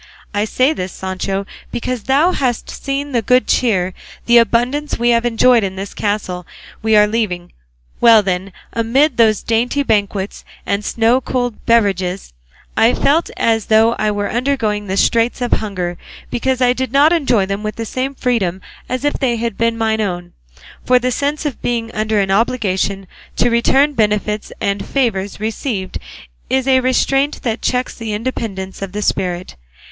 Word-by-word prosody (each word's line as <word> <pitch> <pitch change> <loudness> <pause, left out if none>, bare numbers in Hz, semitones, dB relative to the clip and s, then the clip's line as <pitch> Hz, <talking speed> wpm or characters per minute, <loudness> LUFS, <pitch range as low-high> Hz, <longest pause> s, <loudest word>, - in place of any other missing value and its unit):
I 205 +1 +1
say 255 +6 +2
this, 185 -8 -4
Sancho, 190 +1 -3 0.3
because 240 -1 -3
thou 285 +7 +3
hast 250 -8 -1
seen 280 +1 -4
the 240 -3 +1
good 250 +3 +3
cheer, 190 -7 +1 0.3
the 235 0 +6
abundance 245 +6 +1
we 240 +1 +2
have 235 0 +2
enjoyed 240 0 +4
in 190 -1 -3
this 195 +1 -6
castle 190 -4 -3 0.3
we 220 0 +2
are 210 0 +7
leaving; 205 -5 -2 0.5
well 225 -3 +6
then, 190 0 -2 0.2
amid 250 +7 +2
those 220 -3 +3
dainty 245 +5 +1
banquets 205 -4 -1 0.2
and 200 +1 -1
snow 230 +4 +2
cooled 245 -4 -3
beverages 195 - +1 0.4
I 230 +2 +4
felt 315 +4 +2
as 225 -2 +1
though 220 +1 +4
I 215 - +1
were 205 -1 -2
undergoing 225 -5 -1
the 190 +1 -2
straits 230 +4 +2
of 245 -1 -2
hunger, 185 -5 -2 0.3
because 260 +1 -1
I 245 0 +4
did 260 -1 -3
not 290 +5 +5
enjoy 250 - +2
them 195 +1 -3
with 215 0 -4
the 230 - -4
same 260 +4 -3
freedom 205 -9 0 0.3
as 255 +2 -2
if 290 - +2
they 250 -4 0
had 230 -2 -3
been 230 +1 0
mine 220 -1 0
own; 175 -3 -4 0.5
for 250 - +4
the 250 +1 0
sense 290 +4 -2
of 290 - -3
being 230 -1 -2
under 215 -1 0
an 195 -1 0
obligation 195 -3 0 0.3
to 240 - +2
return 270 +5 +3
benefits 210 -2 0
and 200 0 -1
favours 205 -8 -1
received 215 -2 -3 0.5
is 265 0 +1
a 260 -1 +5
restraint 270 +2 +1
that 230 -2 -2
checks 250 0 -1
the 225 -2 -5
independence 210 -5 -4
of 195 -1 -5
the 210 0 -2
spirit. 180 -2 -2
225 Hz, 170 wpm, -17 LUFS, 200-255 Hz, 0.5 s, are